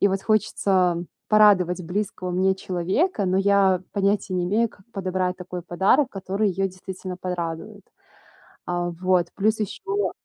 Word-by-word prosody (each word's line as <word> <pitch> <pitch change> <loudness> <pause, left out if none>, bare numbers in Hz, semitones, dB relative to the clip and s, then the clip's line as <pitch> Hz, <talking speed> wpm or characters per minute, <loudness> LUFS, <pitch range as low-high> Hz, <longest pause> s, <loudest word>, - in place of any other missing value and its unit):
И 200 - +5
вот 195 0 -1
хочется 190 -5 +1 0.2
порадовать 195 -4 +4
близкого 185 0 -3
мне 190 +1 +2
человека, 190 - -1
но 185 0 +1
я 195 -2 +3
понятия 200 -1 0
не 180 -1 0
имею, 215 +6 +2
как 190 - -22
подобрать 185 -2 -1
такой 180 -1 -7
подарок, 195 - +2
который 195 +2 -1
её 195 +1 -1
действительно 185 0 -8
порадует. 180 +3 -5 0.9
Э, 175 0 -1
вот 185 -2 +2
плюс 215 +2 +1
ещё, 200 -2 -2
190 Hz, 140 wpm, -24 LUFS, 180-200 Hz, 0.9 s, И